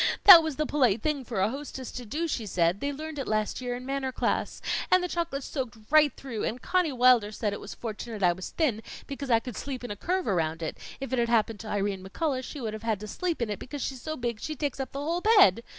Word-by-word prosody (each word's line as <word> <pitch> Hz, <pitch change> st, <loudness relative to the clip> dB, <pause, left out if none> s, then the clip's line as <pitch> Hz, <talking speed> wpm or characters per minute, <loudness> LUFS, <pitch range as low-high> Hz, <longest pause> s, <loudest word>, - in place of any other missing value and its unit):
That 365 Hz, -4 st, +12 dB
was 315 Hz, -3 st, -3 dB
the 305 Hz, -, 0 dB
polite 245 Hz, -8 st, +2 dB
thing 300 Hz, -3 st, 0 dB
for 225 Hz, -5 st, -3 dB
a 195 Hz, -, +3 dB
hostess 270 Hz, -2 st, -6 dB
to 245 Hz, -2 st, -7 dB
do, 315 Hz, +9 st, -2 dB
she 235 Hz, -8 st, -3 dB
said; 175 Hz, 0 st, +1 dB
they 285 Hz, +4 st, -1 dB
learned 310 Hz, +1 st, -6 dB
it 270 Hz, -, -4 dB
last 215 Hz, +3 st, -1 dB
year 245 Hz, -1 st, -2 dB
in 250 Hz, +1 st, -8 dB
manner 270 Hz, -1 st, -2 dB
class. -, -, -1 dB, 0.3 s
And 370 Hz, 0 st, +5 dB
the -, -, 0 dB
chocolate 335 Hz, -6 st, -2 dB
soaked 255 Hz, -5 st, -4 dB
right 305 Hz, -2 st, +6 dB
through, 235 Hz, -6 st, -5 dB
and 240 Hz, -, -2 dB
Conny 360 Hz, +2 st, +1 dB
Wilder 245 Hz, -4 st, +4 dB
said 210 Hz, -1 st, -2 dB
it -, -, -5 dB
was 205 Hz, -, -8 dB
fortunate 220 Hz, -2 st, -6 dB
I 175 Hz, -1 st, +5 dB
was 185 Hz, +1 st, -7 dB
thin, 255 Hz, -10 st, 0 dB, 0.2 s
because 275 Hz, -1 st, -6 dB
I 230 Hz, -2 st, +5 dB
could 235 Hz, -1 st, -8 dB
sleep 265 Hz, -3 st, -5 dB
in 245 Hz, -, -5 dB
a -, -, -3 dB
curve 365 Hz, -, -1 dB
around 165 Hz, -3 st, 0 dB
it; 160 Hz, -, -3 dB, 0.2 s
if 270 Hz, -1 st, -5 dB
it 255 Hz, -, +2 dB
had 235 Hz, 0 st, +1 dB
happened 225 Hz, -2 st, +2 dB
to 225 Hz, -, -8 dB
Irene 200 Hz, -2 st, -1 dB
McCullough, 260 Hz, +7 st, -2 dB
she 290 Hz, -, -7 dB
would 225 Hz, -4 st, -3 dB
have 215 Hz, -, -6 dB
had 220 Hz, -3 st, -1 dB
to 215 Hz, -, -6 dB
sleep 340 Hz, -, -2 dB
in 215 Hz, -, -3 dB
it, 205 Hz, -, -4 dB
because 280 Hz, +1 st, -6 dB
she's 265 Hz, -2 st, -4 dB
so 310 Hz, 0 st, -4 dB
big 235 Hz, -3 st, -3 dB
she 310 Hz, -, -4 dB
takes 285 Hz, -2 st, -3 dB
up 265 Hz, -, -4 dB
the -, -, -6 dB
whole 330 Hz, +5 st, -1 dB
bed. 380 Hz, -, +6 dB
250 Hz, 265 wpm, -28 LUFS, 215-290 Hz, 0.3 s, That